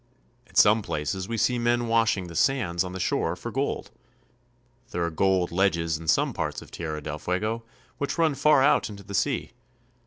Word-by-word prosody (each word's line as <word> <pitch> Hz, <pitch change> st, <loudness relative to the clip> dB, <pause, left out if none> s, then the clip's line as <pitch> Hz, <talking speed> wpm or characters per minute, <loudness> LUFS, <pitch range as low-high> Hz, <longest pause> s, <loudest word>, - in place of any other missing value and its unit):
At 95 Hz, -, -10 dB
some 105 Hz, +2 st, +6 dB
places 90 Hz, +1 st, -3 dB
we 115 Hz, 0 st, -3 dB
see 125 Hz, +2 st, +1 dB
men 120 Hz, 0 st, +1 dB
washing 115 Hz, -4 st, +2 dB
the 85 Hz, -1 st, -10 dB
sands 95 Hz, -, +1 dB
on 90 Hz, -, -6 dB
the 95 Hz, -, -6 dB
shore 85 Hz, -1 st, 0 dB
for 120 Hz, +7 st, -7 dB
gold. 135 Hz, +4 st, -2 dB, 1.0 s
There 85 Hz, -, -2 dB
are 85 Hz, -, -2 dB
gold 95 Hz, +1 st, +1 dB
ledges 85 Hz, -3 st, +1 dB
in 80 Hz, -, -10 dB
some 85 Hz, -, +2 dB
parts -, -, -3 dB
of -, -, -14 dB
Tierra 80 Hz, -3 st, -5 dB
del 75 Hz, 0 st, -5 dB
Fuego 105 Hz, +7 st, -2 dB, 0.4 s
which 140 Hz, -, -2 dB
run 165 Hz, -3 st, +3 dB
far 140 Hz, 0 st, +4 dB
out 145 Hz, -, +3 dB
into 100 Hz, -1 st, -10 dB
the 100 Hz, -, -9 dB
sea. 130 Hz, +6 st, 0 dB
100 Hz, 190 wpm, -26 LUFS, 85-120 Hz, 1.0 s, some